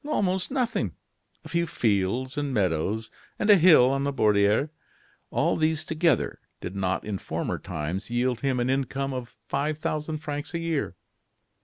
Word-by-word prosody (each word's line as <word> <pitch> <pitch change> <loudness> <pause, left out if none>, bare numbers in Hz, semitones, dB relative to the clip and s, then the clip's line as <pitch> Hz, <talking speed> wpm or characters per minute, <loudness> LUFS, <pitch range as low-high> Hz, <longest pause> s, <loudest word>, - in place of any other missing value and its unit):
Almost 190 -11 0
nothing. 255 -3 -1 0.5
A - - -6
few 170 0 0
fields 115 +1 0
and 145 -1 -1
meadows 100 +1 0 0.3
and 210 - +4
a - - +10
hill 155 -7 +7
on 135 0 0
the 140 - 0
Borderie. 105 +2 +3 0.6
All - - +1
these 155 -1 +1
together 160 -3 +1 0.2
did 95 - -6
not 95 -1 -1
in 105 -3 -3
former - - -3
times 85 +7 -4
yield 120 0 0
him 135 -2 0
an 120 - +1
income 135 +1 -1
of 125 -2 -5
five 150 +2 -3
thousand 155 0 -2
francs 150 +1 -5
a - - 0
year." 165 -3 -2
135 Hz, 160 wpm, -26 LUFS, 110-155 Hz, 0.6 s, a